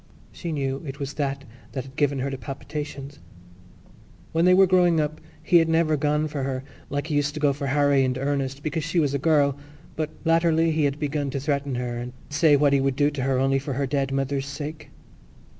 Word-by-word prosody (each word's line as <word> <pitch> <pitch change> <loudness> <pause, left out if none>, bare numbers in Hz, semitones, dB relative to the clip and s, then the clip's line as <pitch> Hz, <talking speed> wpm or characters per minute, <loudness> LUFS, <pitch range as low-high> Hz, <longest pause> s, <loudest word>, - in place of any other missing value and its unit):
She 170 - -6
knew 135 -2 -2
it 140 -1 -7
was 140 0 -4
that 140 -1 -2 0.3
that 130 - -3
had 135 0 -14
given 145 -2 +1
her 135 +1 -2
the 135 - -4
palpitations. 140 +2 -6 1.1
When 165 +1 +2
they 180 - +6
were 195 +1 +7
growing 175 -3 +4
up 155 0 -2 0.2
he 175 - +5
had 165 -1 +3
never 160 -1 +3
gone 150 +1 +1
for 145 -2 -4
her 130 -1 -2 0.3
like 145 +1 -2
he 160 - -4
used 145 0 0
to - - -3
go 145 -2 +3
for 140 0 -4
Harry 140 0 +3
and 130 -1 0
Ernest, 140 0 -2
because 155 +1 -2
she 165 +2 0
was 145 -3 +1
a 140 - 0
girl; 145 -2 +3 0.4
but 155 -1 -2 0.2
latterly 165 0 +3
he 155 -1 +1
had 140 0 0
begun 145 -1 -2
to 140 - -3
threaten 140 -1 -1
her 120 -1 -3
and 125 +1 -6 0.2
say 145 +1 +5
what 145 0 +3
he 140 - +3
would 135 -1 +1
do 145 +1 +2
to 145 -2 -4
her 130 0 +1
only 135 +1 +2
for 140 0 -4
her 140 +2 -1
dead 135 0 -1
mother's 135 0 -1
sake. 145 +2 -6
145 Hz, 225 wpm, -25 LUFS, 135-155 Hz, 1.1 s, were